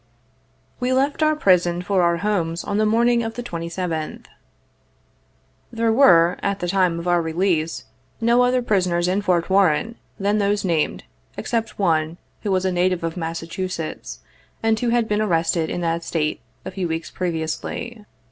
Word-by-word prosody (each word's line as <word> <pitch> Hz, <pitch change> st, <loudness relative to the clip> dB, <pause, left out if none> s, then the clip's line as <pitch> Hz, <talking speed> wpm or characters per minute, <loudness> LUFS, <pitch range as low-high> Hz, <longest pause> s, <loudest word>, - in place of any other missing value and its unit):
We 250 Hz, +1 st, 0 dB
left 275 Hz, +4 st, +1 dB
our 310 Hz, 0 st, +3 dB
prison 180 Hz, -, +2 dB
for 190 Hz, 0 st, +1 dB
our 170 Hz, -1 st, +2 dB
homes 170 Hz, -5 st, -1 dB
on 205 Hz, -, -1 dB
the 215 Hz, -, +3 dB
morning 235 Hz, +2 st, +3 dB
of 225 Hz, -1 st, -4 dB
the 245 Hz, -, -5 dB
27th. 170 Hz, -4 st, -4 dB, 1.5 s
There 230 Hz, -1 st, +1 dB
were, 175 Hz, -9 st, +5 dB
at 200 Hz, 0 st, -1 dB
the 175 Hz, -, -3 dB
time 180 Hz, -2 st, +2 dB
of 170 Hz, +1 st, -5 dB
our 175 Hz, -1 st, +3 dB
release, 165 Hz, -1 st, -1 dB, 0.3 s
no 235 Hz, +2 st, +3 dB
other 250 Hz, 0 st, +2 dB
prisoners 180 Hz, -6 st, +1 dB
in 190 Hz, +3 st, +1 dB
Fort 180 Hz, -4 st, +1 dB
Warren 195 Hz, +2 st, +2 dB, 0.3 s
than 205 Hz, +2 st, +1 dB
those 205 Hz, 0 st, +1 dB
named, 165 Hz, -4 st, 0 dB, 0.3 s
except 225 Hz, -2 st, -2 dB
one, 165 Hz, -3 st, +1 dB, 0.2 s
who 210 Hz, -, -3 dB
was 190 Hz, 0 st, +1 dB
a 185 Hz, -, +1 dB
native 180 Hz, -1 st, +1 dB
of 165 Hz, -1 st, -2 dB
Massachusetts, 165 Hz, -, -5 dB, 0.4 s
and 220 Hz, -1 st, +2 dB
who 245 Hz, -, 0 dB
had 235 Hz, -1 st, +2 dB
been 210 Hz, 0 st, 0 dB
arrested 165 Hz, -4 st, +1 dB
in 175 Hz, -, -3 dB
that 165 Hz, 0 st, -1 dB
State, 155 Hz, -2 st, -2 dB, 0.2 s
a -, -, -5 dB
few 185 Hz, -2 st, -3 dB
weeks 160 Hz, 0 st, -4 dB
previously. 180 Hz, +7 st, -4 dB
185 Hz, 165 wpm, -22 LUFS, 170-215 Hz, 1.5 s, were